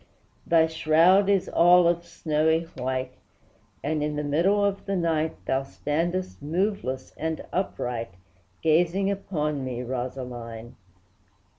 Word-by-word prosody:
Thy 165 Hz, -1 st, +5 dB
shroud 165 Hz, +5 st, +4 dB
is 195 Hz, -2 st, +2 dB
all 175 Hz, 0 st, +5 dB
of 170 Hz, 0 st, +1 dB
snowy 160 Hz, 0 st, +1 dB
white, 130 Hz, 0 st, -2 dB, 0.7 s
And, 155 Hz, +1 st, -1 dB
in 150 Hz, 0 st, -1 dB
the 150 Hz, -, -2 dB
middle 180 Hz, +8 st, +2 dB
of 200 Hz, 0 st, -2 dB
the 195 Hz, -, 0 dB
night, 160 Hz, -3 st, 0 dB
Thou 135 Hz, 0 st, +1 dB
standest 170 Hz, +7 st, -3 dB
moveless 160 Hz, -4 st, -2 dB
and 160 Hz, 0 st, -3 dB
upright, 120 Hz, -, -3 dB, 0.5 s
Gazing 175 Hz, +5 st, +2 dB
upon 150 Hz, -8 st, -2 dB
me, 125 Hz, -1 st, -4 dB
Rosaline! 120 Hz, -2 st, -6 dB
160 Hz, 120 wpm, -26 LUFS, 135-180 Hz, 0.7 s, Thy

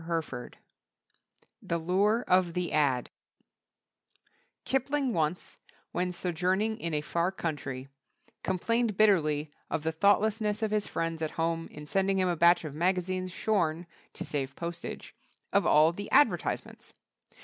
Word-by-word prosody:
THE 170 Hz, -, -2 dB
LURE 200 Hz, +8 st, +2 dB
OF 180 Hz, -2 st, +3 dB
THE 180 Hz, -2 st, -2 dB
"AD" 140 Hz, -5 st, +1 dB, 1.5 s
Kipling 270 Hz, 0 st, 0 dB
once, 160 Hz, 0 st, -2 dB, 0.3 s
when 180 Hz, 0 st, -1 dB
sojourning 185 Hz, +5 st, -1 dB
in 170 Hz, -, -3 dB
a 150 Hz, -, 0 dB
far 170 Hz, +4 st, 0 dB
country, 140 Hz, -7 st, -4 dB, 0.5 s
complained 220 Hz, +3 st, 0 dB
bitterly 155 Hz, -8 st, +3 dB, 0.2 s
of 150 Hz, -, -2 dB
the 160 Hz, -, 0 dB
thoughtlessness 210 Hz, +4 st, +2 dB
of 215 Hz, -, 0 dB
his 210 Hz, -1 st, 0 dB
friends 165 Hz, -1 st, -3 dB
at 160 Hz, -, 0 dB
home 165 Hz, 0 st, -1 dB
in 150 Hz, 0 st, -10 dB
sending 195 Hz, +4 st, +1 dB
him 185 Hz, -1 st, +2 dB
a 175 Hz, -, +1 dB
batch 170 Hz, +1 st, +4 dB
of 150 Hz, -, -5 dB
magazines 185 Hz, +2 st, -1 dB
shorn 175 Hz, -4 st, 0 dB, 0.3 s
(to -, -, -6 dB
save 140 Hz, -1 st, -3 dB
postage) 170 Hz, 0 st, -6 dB, 0.4 s
of -, -, +3 dB
all 155 Hz, +2 st, +6 dB
the 205 Hz, +4 st, -7 dB
advertisements. 290 Hz, -, +1 dB
180 Hz, 130 wpm, -29 LUFS, 160-205 Hz, 1.5 s, all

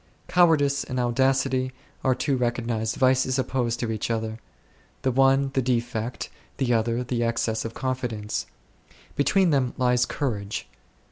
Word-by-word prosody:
Cowardice 155 Hz, -6 st, +4 dB
and 130 Hz, -, -4 dB
audacity 130 Hz, +1 st, +1 dB, 0.3 s
are 130 Hz, -1 st, +3 dB
two 140 Hz, +2 st, 0 dB
recognized 120 Hz, -2 st, -1 dB
vices 130 Hz, 0 st, +3 dB
opposed 120 Hz, -3 st, -1 dB
to 115 Hz, -2 st, -1 dB
each 110 Hz, 0 st, -3 dB
other; 110 Hz, -1 st, -2 dB, 0.6 s
the 130 Hz, -, +2 dB
one 135 Hz, +1 st, +3 dB
the 135 Hz, -, +2 dB
defect, 120 Hz, -1 st, -2 dB, 0.3 s
the 125 Hz, -3 st, +1 dB
other 115 Hz, +2 st, +1 dB
the 120 Hz, -1 st, -1 dB
excess 115 Hz, -1 st, 0 dB
of 115 Hz, -, -6 dB
confidence; 125 Hz, -5 st, -3 dB, 0.7 s
between 180 Hz, +5 st, +3 dB
them 130 Hz, -4 st, +1 dB
lies 125 Hz, -1 st, +2 dB
courage. 105 Hz, -7 st, -3 dB
125 Hz, 135 wpm, -25 LUFS, 115-135 Hz, 0.7 s, Cowardice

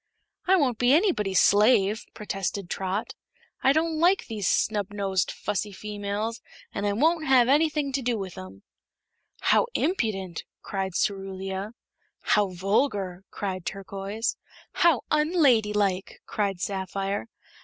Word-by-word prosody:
"I 380 Hz, -, +6 dB
won't 260 Hz, -, +1 dB
be 245 Hz, +2 st, +4 dB
anybody's 250 Hz, -, +3 dB
slave," 210 Hz, 0 st, +4 dB
protested 195 Hz, -2 st, -4 dB
Trot. 190 Hz, +2 st, -2 dB, 0.5 s
"I 265 Hz, -, +5 dB
don't 315 Hz, +1 st, +1 dB
like 360 Hz, +4 st, +3 dB
these 210 Hz, -5 st, -3 dB
snubnosed, 200 Hz, -3 st, 0 dB
fussy 210 Hz, 0 st, -3 dB
females 210 Hz, +2 st, -4 dB, 0.3 s
an' 200 Hz, -, -2 dB
I 205 Hz, -, +1 dB
won't 315 Hz, +7 st, +2 dB
have 255 Hz, -3 st, +5 dB
anything 295 Hz, 0 st, +2 dB
to 275 Hz, -, 0 dB
do 240 Hz, -2 st, 0 dB
with 190 Hz, -3 st, -6 dB
'em." 95 Hz, +1 st, -10 dB, 0.8 s
"How -, -, +3 dB
impudent!" 200 Hz, -, -1 dB, 0.2 s
cried 190 Hz, -2 st, -3 dB
Cerulia. 195 Hz, +1 st, -2 dB, 0.5 s
"How 210 Hz, -1 st, +3 dB
vulgar!" 195 Hz, 0 st, -1 dB
cried 185 Hz, -3 st, -4 dB
Turquoise. 195 Hz, +4 st, -4 dB, 0.3 s
"How 335 Hz, -7 st, +3 dB
unladylike!" 220 Hz, -, +2 dB
cried 200 Hz, -3 st, -2 dB
Sapphire. 195 Hz, +1 st, -3 dB
205 Hz, 120 wpm, -26 LUFS, 195-255 Hz, 0.8 s, I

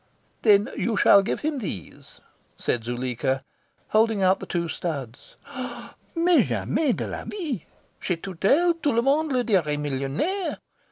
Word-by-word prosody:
"Then 210 Hz, -1 st, +5 dB
you 225 Hz, -3 st, -1 dB
shall 200 Hz, -, +7 dB
give 195 Hz, -, -2 dB
him 300 Hz, -2 st, -1 dB
these," 130 Hz, -, -7 dB, 0.4 s
said 120 Hz, -, -1 dB
Zuleika, 130 Hz, +2 st, -2 dB, 0.5 s
holding 215 Hz, -2 st, +3 dB
out 185 Hz, +1 st, +4 dB
the -, -, -8 dB
two 170 Hz, -1 st, -1 dB
studs. 140 Hz, -8 st, -5 dB, 0.8 s
"Mais 340 Hz, +1 st, +4 dB
jamais 305 Hz, -5 st, 0 dB
de -, -, -3 dB
la -, -, -5 dB
vie! 305 Hz, -, -4 dB, 0.3 s
Chez 180 Hz, -, -1 dB
Tourtel 195 Hz, -, +2 dB
tout 290 Hz, -, +2 dB
le 235 Hz, -, +3 dB
monde 295 Hz, +3 st, +2 dB
le 250 Hz, -2 st, +2 dB
dirait 175 Hz, -10 st, +1 dB
millionaire. 145 Hz, -, -2 dB
200 Hz, 145 wpm, -25 LUFS, -, 0.8 s, shall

